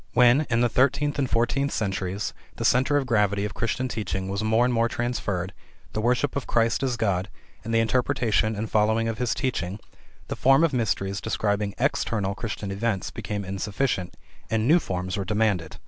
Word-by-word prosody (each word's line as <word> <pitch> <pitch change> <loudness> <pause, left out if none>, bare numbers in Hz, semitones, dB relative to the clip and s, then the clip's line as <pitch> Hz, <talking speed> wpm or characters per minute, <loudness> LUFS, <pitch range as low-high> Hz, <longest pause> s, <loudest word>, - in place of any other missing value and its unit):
When, 125 +5 +5
in 115 0 +2
the 120 - +4
thirteenth 140 +4 +1
and 135 -3 0
fourteenth 130 +5 +1
centuries, 95 -1 -2 0.2
the - - -3
center 130 +4 +3
of 140 - 0
gravity 105 -4 +1
of 105 - -4
Christian 115 +3 -1
teaching 95 -5 -3
was 100 +2 -2
more 110 +2 +3
and 125 - +1
more 115 0 +2
transferred, 105 -7 -2 0.4
the 110 - -1
worship 125 +4 +1
of 140 - -3
Christ 115 0 +2
as 130 -3 0
God, 95 -4 0 0.3
and 115 - -5
the 115 0 +3
interpretation 115 -2 +1
and 110 +2 -3
following 110 +2 +2
of 115 -1 -3
His 125 -2 0
teaching, 110 - -2 0.5
the - - -3
form 135 +4 +4
of 165 -4 +2
Mysteries 100 -4 -1
describing 105 -2 -1
external 100 -3 0
Christian 105 -2 -5
events 100 -1 -2
became 105 -1 -4
insufficient, 100 +1 -2 0.3
and 110 0 +1
new 165 +5 +6
forms 95 - -3
were 100 - -1
demanded. 105 -5 0
110 Hz, 180 wpm, -25 LUFS, 100-125 Hz, 0.5 s, new